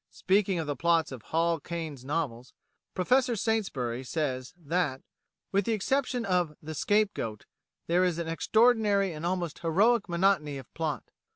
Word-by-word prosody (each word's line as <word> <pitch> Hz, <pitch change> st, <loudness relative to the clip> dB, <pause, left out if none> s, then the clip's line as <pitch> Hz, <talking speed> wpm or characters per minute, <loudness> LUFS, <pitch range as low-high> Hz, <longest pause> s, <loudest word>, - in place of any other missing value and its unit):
Speaking 195 Hz, -1 st, +1 dB
of 165 Hz, -, -2 dB
the 145 Hz, -1 st, -2 dB
plots 165 Hz, +2 st, +2 dB
of 130 Hz, -3 st, -7 dB
Hall 165 Hz, +5 st, 0 dB
Caine's 160 Hz, -5 st, -6 dB
novels, 135 Hz, -4 st, -3 dB, 0.4 s
Professor 250 Hz, +6 st, +2 dB
Saintsbury 150 Hz, -, -1 dB
says 130 Hz, -3 st, -2 dB
that, 160 Hz, -4 st, -1 dB, 0.5 s
"with 200 Hz, 0 st, +2 dB
the 230 Hz, -, +1 dB
exception 250 Hz, +3 st, 0 dB
of 180 Hz, -5 st, 0 dB
'The 155 Hz, +1 st, -7 dB
Scapegoat,' 195 Hz, -, 0 dB, 0.4 s
there 175 Hz, +2 st, +3 dB
is 180 Hz, -3 st, +1 dB
an 170 Hz, -1 st, -3 dB
extraordinary 205 Hz, +1 st, +3 dB
and 155 Hz, +2 st, -4 dB
almost 175 Hz, -3 st, -2 dB
heroic 200 Hz, +8 st, +2 dB
monotony 170 Hz, -5 st, +2 dB
of 130 Hz, -, -11 dB
plot. 160 Hz, -4 st, -3 dB
170 Hz, 150 wpm, -29 LUFS, 150-200 Hz, 0.5 s, there